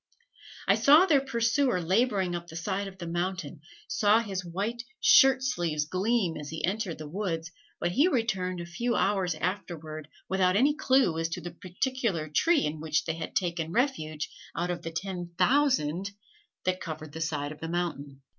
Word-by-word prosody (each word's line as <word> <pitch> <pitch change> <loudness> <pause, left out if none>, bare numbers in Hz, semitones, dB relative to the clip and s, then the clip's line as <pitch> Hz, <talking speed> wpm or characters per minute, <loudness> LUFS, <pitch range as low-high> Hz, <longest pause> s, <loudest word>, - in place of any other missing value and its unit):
I - - +6
saw 300 +6 +6
their 295 -7 +4
pursuer 240 -3 +1
laboring 190 +1 +1
up 175 0 -5
the 160 - -11
side 195 +4 -2
of 190 -1 -10
the 175 - -6
mountain; 175 -3 -3 0.3
saw 210 +1 +4
his 195 -5 -3
white 200 +7 -3 0.2
shirt 270 -12 +6
sleeves 170 - 0
gleam 185 +1 0
as 150 -1 -7
he 160 0 -2
entered 190 -2 -2
the 155 -1 -7
woods; 165 -2 -3 0.3
but 175 - 0
he 280 - +4
returned 195 - 0
a 170 - -5
few 235 +8 -2
hours 190 -4 +1
afterward 160 -4 -4 0.2
without 185 -1 +2
any 275 +8 +4
clew 260 - +2
as 165 0 -1
to 165 - -4
the 175 - -6
particular 185 - -2
tree 310 - +3
in 150 +1 -3
which 155 0 0
they 160 - -1
had 160 0 -6
taken 170 -3 -1
refuge 160 - -1 0.3
out 175 +1 -1
of 175 - -4
the 165 - -5
ten 175 0 -5
thousand 200 - +2 0.6
that 185 0 0
covered 155 -2 -6
the 160 +2 -7
side 150 -3 -2
of 155 - -10
the 160 - -5
mountain. 145 -6 -3
180 Hz, 180 wpm, -28 LUFS, 160-225 Hz, 0.6 s, I